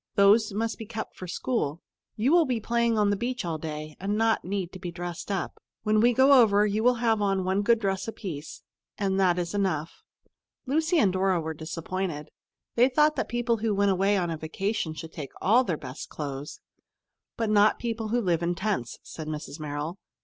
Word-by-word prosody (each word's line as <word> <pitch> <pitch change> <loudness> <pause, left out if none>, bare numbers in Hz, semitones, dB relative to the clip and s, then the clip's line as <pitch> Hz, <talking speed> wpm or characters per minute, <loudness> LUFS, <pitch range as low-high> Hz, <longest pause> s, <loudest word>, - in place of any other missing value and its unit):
"Those 210 +2 +5
must 225 +3 -2
be 225 - -7
kept 220 -1 -6
for 185 - -8
school. 170 - -2 0.4
You 235 +6 +1
will 340 -1 +5
be 245 -3 0
playing 235 0 +1
on 205 -1 +3
the - - +2
beach 240 +1 -3
all 160 -2 -2
day, 155 -1 -6
and 205 +2 -1
not 225 0 +2
need 190 -1 -3
to 185 - -10
be 180 - -5
dressed 175 +1 -6
up. 195 -3 -3 0.2
When 215 0 +3
we 240 +2 +5
go 265 +2 +6
over, 210 -2 +4
you 210 +1 0
will 250 +1 +5
have 220 -2 +3
on 195 -2 +1
one 190 +2 +1
good 230 +3 +4
dress 195 -2 -2
apiece, 170 -9 -7 0.3
and 195 -1 0
that 180 -2 +3
is 175 0 -2
enough." 180 -6 -1 0.6
Lucy 320 +6 +1
and 200 - +3
Dora 190 -1 +2
were 160 0 -3
disappointed. 165 0 -4 0.4
They 245 +2 +4
thought 300 +3 +3
that - - -2
people 240 -1 0
who 215 -1 0
went 200 0 +3
away 195 +2 +2
on 175 -3 -1
a 160 - -3
vacation 160 +1 -2
should 160 0 -8
take 145 -4 -7
all 235 +6 +4
their 175 -10 -2
best 130 +1 -8
clothes. 145 -1 -6 0.8
"But 225 -2 0
not 210 0 +5
people 225 -2 -3
who 240 +3 +1
live 175 -5 +1
in 175 +1 0
tents," 190 - -2
said 155 -1 -8
Mrs. 150 0 -6
Merrill. 150 +4 -4
195 Hz, 205 wpm, -27 LUFS, 170-225 Hz, 0.8 s, go